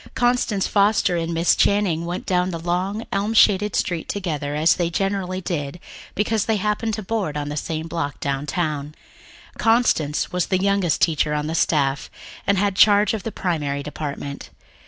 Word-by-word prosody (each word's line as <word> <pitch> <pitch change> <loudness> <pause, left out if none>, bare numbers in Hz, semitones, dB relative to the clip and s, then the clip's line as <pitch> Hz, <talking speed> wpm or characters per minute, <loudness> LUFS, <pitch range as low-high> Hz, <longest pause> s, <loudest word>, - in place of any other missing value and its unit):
Constance 240 -5 +1
Foster 200 -3 +2
and 165 0 -2
Miss 165 +1 +3
Channing 190 -5 +2
went 175 +1 -4
down 180 0 +1
the 170 - -4
long, 180 +6 -2
elm 205 +3 -1
shaded 210 -1 +4
street 170 -3 -1
together, 150 -7 -3
as 155 +2 +4
they 175 -2 0
generally 190 0 -2
did, 165 -3 -4 0.4
because 215 0 0
they 220 - +1
happened 210 +2 -1
to 215 - -6
board 190 -7 -2
on 145 0 -3
the 145 - -4
same 160 +1 -3
block 165 -4 -3
downtown. 150 +1 -2 0.6
Constance 225 -11 +2
was 180 0 0
the 185 - +1
youngest 195 -3 +1
teacher 155 -2 +2
on 150 0 -1
the 160 - -3
staff, 145 -4 +1 0.4
and 200 - +3
had 200 0 +1
charge 205 +1 +5
of 220 - -3
the 225 - -5
Primary 145 -8 -2
Department. 145 -1 -6
175 Hz, 170 wpm, -22 LUFS, 155-200 Hz, 0.6 s, charge